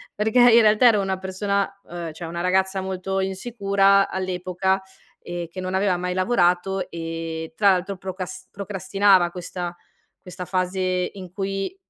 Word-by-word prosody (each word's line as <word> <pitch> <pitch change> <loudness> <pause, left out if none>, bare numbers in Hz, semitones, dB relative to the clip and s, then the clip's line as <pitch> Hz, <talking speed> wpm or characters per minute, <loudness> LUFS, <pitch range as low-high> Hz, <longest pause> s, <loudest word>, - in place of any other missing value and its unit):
perché 220 +3 0
in 235 - +7
realtà 215 +3 +5
ero 210 -3 +5
una 190 -1 -1
persona, 200 +1 -1
uhm, 170 -2 -6
cioè 170 +1 -7
una 170 +1 -4
ragazza 190 +1 +1
molto 190 0 -3
insicura 195 0 +2
all'epoca, 185 +1 -1 0.4
ehm, 175 -1 -5
che 185 - -8
non 185 0 -4
aveva 190 -1 +2
mai 180 +1 -2
lavorato 185 -1 +1
e 165 -1 -5
tra 200 +3 +4
l'altro 185 +1 -1
procas 185 0 -6
procrastinava 195 -2 +2
questa 175 0 -5 0.5
questa 180 0 -8
fase 185 +1 -1 0.3
in 185 -3 -10
cui 195 - -3
190 Hz, 145 wpm, -23 LUFS, 180-195 Hz, 0.5 s, in